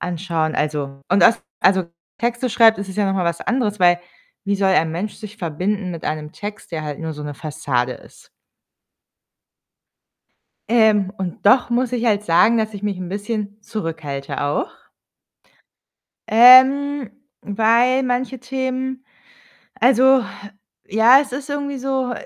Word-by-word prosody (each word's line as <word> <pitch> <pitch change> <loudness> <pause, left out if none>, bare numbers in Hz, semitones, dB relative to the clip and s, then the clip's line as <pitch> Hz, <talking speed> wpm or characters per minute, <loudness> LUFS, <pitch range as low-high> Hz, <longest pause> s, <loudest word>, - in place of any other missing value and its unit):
anschauen, 165 -3 -2
also 145 -2 -3
und 195 - +3
aus 230 - +4 0.2
also, 190 0 +3 0.3
Texte 240 +1 -2
schreibt, 225 -1 +5
ist 200 -1 -6
es 190 - -9
ja 205 -1 +1
noch 195 - -1
mal 185 - -1
was 170 -1 -2
anderes, 225 -5 -1
weil 175 -1 +4 0.4
wie 200 0 0
soll 195 -1 +1
ein 165 -3 +2
Mensch 195 +6 -4
sich 215 -1 -11
verbinden 185 +3 -3
mit 165 - -8
einem 155 0 -4
Text, 210 -3 -9
der 160 -2 -3
halt 150 -1 -6
nur 160 -1 -4
so 150 - -8
'ne 145 0 -6
Fassade 135 -4 -3
ist? - - -18 2.4
Ähm, 215 -4 +3
und 190 0 -6
doch 245 +4 +4
muss 245 +1 0
ich 245 -1 -2
halt 210 -2 +1
sagen, 210 +6 +3
dass 220 -1 -2
ich 200 - -8
mich 205 -2 -2
'n 180 -1 -6
bisschen 205 +1 -4
zurückhalte 160 -10 -5
auch. 145 0 -1 1.6
Ähm, 260 +3 +6 0.3
weil 230 +5 +2
manche 255 0 -2
Themen 260 0 -4 0.8
Also, 260 0 +4 0.6
ja, 225 +6 +5
es 280 -3 -6
ist 275 +2 -6
irgendwie 285 -1 -4
so, 265 -1 -2
210 Hz, 150 wpm, -20 LUFS, 175-250 Hz, 2.4 s, Ähm